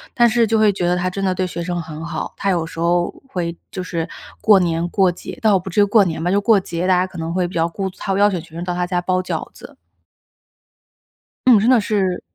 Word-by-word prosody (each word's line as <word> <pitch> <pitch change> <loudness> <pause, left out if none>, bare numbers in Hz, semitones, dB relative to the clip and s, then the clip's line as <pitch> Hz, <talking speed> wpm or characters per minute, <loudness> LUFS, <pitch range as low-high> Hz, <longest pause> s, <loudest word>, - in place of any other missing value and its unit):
但 240 -1 +5
是 230 0 +2
就 225 +1 +2
会 215 -2 +4
觉 175 -2 -1
得 180 - +1
她 180 +1 -1
真 195 +2 -4
的 190 -1 +1
对 185 0 -1
学 170 -1 -5
生 175 0 -3
很 160 0 -8
好， 165 -1 -5
她 200 - -1
有 170 -3 +1
时 165 - -9
候 175 +1 +1 0.2
会 170 -8 -3 0.2
就 185 - -5
是 170 -2 -3 0.3
过 210 -3 +6
年、 170 -2 0
过 190 -1 +3
节， 175 - -9
倒 210 -4 +4
不 185 - -8
至 205 +3 +2
于 - - +7
过 205 +1 +4
年 160 -4 -3
吧， 175 - 0
就 200 - +2
过 215 -1 +4
节， 175 -1 -3
大 185 - +4
家 180 - +2
可 185 - -11
能 165 +1 -3
会 180 -1 0
比 175 - -11
较 165 0 +1
顾 190 +3 -3
她 195 +1 -3
邀 205 +1 +5
请 185 -4 -3
学 165 0 -16
生 170 - -4
到 180 0 -2
她 180 0 -1
家 180 -1 0
包 185 +1 0
饺 185 - -4
子。 - - -14 1.7
嗯， 245 -5 +7
真 220 +4 +2
的 255 -2 +6
是 200 -4 -1
185 Hz, 280 characters per minute, -19 LUFS, 170-200 Hz, 1.7 s, 于